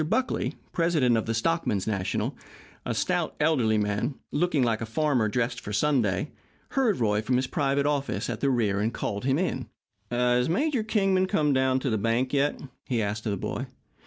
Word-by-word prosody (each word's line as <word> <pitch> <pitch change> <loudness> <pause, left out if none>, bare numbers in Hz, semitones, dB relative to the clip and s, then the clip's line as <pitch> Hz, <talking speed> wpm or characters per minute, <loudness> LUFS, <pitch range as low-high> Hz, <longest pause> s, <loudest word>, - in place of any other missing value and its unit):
Buckley, 260 0 0 0.2
president 160 -8 +2
of 110 - -1
the 115 - 0
Stockmen's 115 - 0
National 100 -4 -1 0.5
a - - -1
stout, - - 0
elderly 130 -8 +3
man, 105 +6 -1 0.2
looking 150 -2 +1
like 115 -2 +1
a 115 - -3
farmer 125 -3 +1
dressed 120 +2 -1
for 105 - -7
Sunday 120 -2 +1 0.4
heard 245 - +1
Roy 105 -2 +2
from 125 +3 0
his 130 +1 +2
private 140 +1 0
office 145 -1 -1
at - - -3
the 140 - +1
rear 110 -6 +1
and 110 +3 0
called 105 -1 -3
him. 135 -1 0 0.4
"Has 125 +1 +2
Major 270 - +1
Kingman 195 -4 +2
come 150 -7 +2
down 130 0 +2
to 130 - -1
the 110 - +1
bank 115 +5 0
yet?" 145 +1 +1 0.3
he 120 -3 0
asked 105 +1 -2
of - - +1
the 100 - -1
boy. - - -4
130 Hz, 185 wpm, -27 LUFS, 110-150 Hz, 0.5 s, elderly